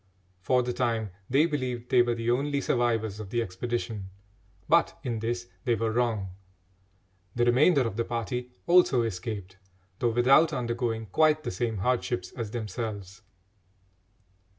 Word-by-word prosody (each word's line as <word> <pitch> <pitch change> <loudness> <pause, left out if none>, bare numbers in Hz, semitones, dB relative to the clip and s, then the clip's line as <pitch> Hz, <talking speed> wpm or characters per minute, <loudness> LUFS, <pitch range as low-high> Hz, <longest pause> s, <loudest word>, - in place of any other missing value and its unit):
For 125 +6 +2
the 125 0 -2
time 115 -4 -1 0.2
they 140 +5 +4
believed 125 -6 -3
they 125 - +6
were 120 -1 +1
the 115 +1 -1
only 140 +3 0
survivors 115 -5 0
of 105 -3 -7
the 120 - -1
expedition, 110 -1 -3 0.6
but 170 +1 +3
in 120 -4 -2
this 120 +2 -3 0.2
they 120 -3 +2
were 115 +1 -1
wrong. 110 -5 0 1.1
The 120 0 +2
remainder 135 +5 +4
of 115 -4 -2
the 115 - +1
party 120 +1 -3 0.2
also 170 -9 +5
escaped, 95 -2 -5 0.4
though 120 - +2
without 135 +7 +4
undergoing 120 -3 -2
quite 155 - +3
the - - -3
same 110 +4 -2
hardships 120 +3 -1
as 115 -4 -5
themselves. 105 -3 -5
120 Hz, 145 wpm, -28 LUFS, 110-125 Hz, 1.1 s, they